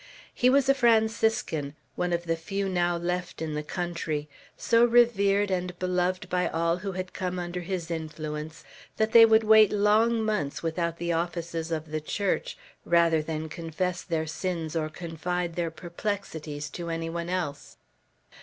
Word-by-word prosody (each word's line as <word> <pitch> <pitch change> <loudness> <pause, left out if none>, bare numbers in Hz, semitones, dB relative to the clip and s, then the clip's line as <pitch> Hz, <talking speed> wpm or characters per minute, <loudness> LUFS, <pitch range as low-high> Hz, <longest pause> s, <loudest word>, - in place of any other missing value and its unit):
He 250 - +3
was 275 +1 +4
a 275 - +6
Franciscan, 220 - +1 0.2
one 180 0 -1
of 170 0 0
the 165 -1 0
few 195 +5 -3
now 175 -2 +1
left 180 +1 -3
in 160 -1 -3
the 150 - -2
country; 165 -2 -3 0.3
so 230 0 +3
revered 205 -4 +4
and 180 -1 -2
beloved 180 +1 -1
by 180 0 0
all 165 +1 0
who 195 +1 -5
had 185 0 -5
come 185 -1 -3
under 175 0 -4
his 175 -1 -4
influence, 155 -1 -5 0.3
that 220 0 +1
they 230 -1 +9
would 220 0 +5
wait 215 -1 +7
long 220 +2 +3
months 170 -11 -2
without 170 0 -1
the 170 0 -1
offices 170 -1 -3
of 155 -1 -3
the 155 0 -2
Church, 205 - -2 0.3
rather 170 -2 +3
than 155 0 -4
confess 170 +3 -3
their 160 -3 -2
sins 165 0 -3
or 155 -1 -1
confide 170 +2 -3
their 170 -2 -1
perplexities 160 -4 -5
to 170 +1 -5
any 165 0 -2
one 170 0 -4
else. 170 -6 -4
175 Hz, 165 wpm, -27 LUFS, 165-195 Hz, 0.3 s, they